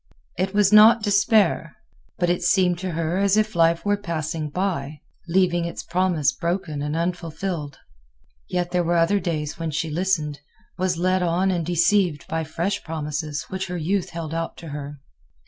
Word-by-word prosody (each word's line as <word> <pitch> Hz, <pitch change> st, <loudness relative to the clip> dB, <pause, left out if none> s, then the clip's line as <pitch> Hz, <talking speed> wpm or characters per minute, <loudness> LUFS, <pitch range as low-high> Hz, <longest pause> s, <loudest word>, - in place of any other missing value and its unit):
It 190 Hz, +3 st, -2 dB
was 205 Hz, 0 st, +4 dB
not 215 Hz, +1 st, +8 dB
despair; 200 Hz, -5 st, +2 dB, 0.4 s
but 175 Hz, -, +1 dB
it 175 Hz, +1 st, +1 dB
seemed 180 Hz, -1 st, +2 dB
to 185 Hz, -2 st, -4 dB
her 165 Hz, +3 st, -1 dB
as 200 Hz, +1 st, +3 dB
if 215 Hz, 0 st, +1 dB
life 165 Hz, +1 st, +3 dB
were 205 Hz, 0 st, +2 dB
passing 160 Hz, -5 st, -3 dB
by, 150 Hz, -4 st, -2 dB, 0.3 s
leaving 175 Hz, -1 st, +2 dB
its 170 Hz, -, -5 dB
promise 175 Hz, -4 st, +1 dB
broken 170 Hz, -4 st, -3 dB
and 150 Hz, +1 st, -2 dB
unfulfilled. 170 Hz, -3 st, -3 dB, 0.7 s
Yet 175 Hz, -1 st, -1 dB
there 180 Hz, -1 st, +1 dB
were 170 Hz, +1 st, +1 dB
other 170 Hz, +5 st, +3 dB
days 155 Hz, -4 st, -3 dB
when 165 Hz, -1 st, -2 dB
she 155 Hz, +1 st, -2 dB
listened, 155 Hz, -4 st, -1 dB, 0.4 s
was 185 Hz, -2 st, -1 dB
led 185 Hz, +2 st, +1 dB
on 180 Hz, +2 st, +1 dB
and 175 Hz, -2 st, -1 dB
deceived 175 Hz, -1 st, +2 dB
by 160 Hz, 0 st, -2 dB
fresh 170 Hz, +5 st, -2 dB
promises 150 Hz, -1 st, -4 dB
which 190 Hz, 0 st, -4 dB
her 180 Hz, 0 st, -4 dB
youth 180 Hz, +3 st, -1 dB
held 165 Hz, -2 st, -6 dB
out 165 Hz, 0 st, -3 dB
to 165 Hz, -, -9 dB
her. 145 Hz, 0 st, -7 dB
175 Hz, 170 wpm, -23 LUFS, 160-190 Hz, 0.7 s, not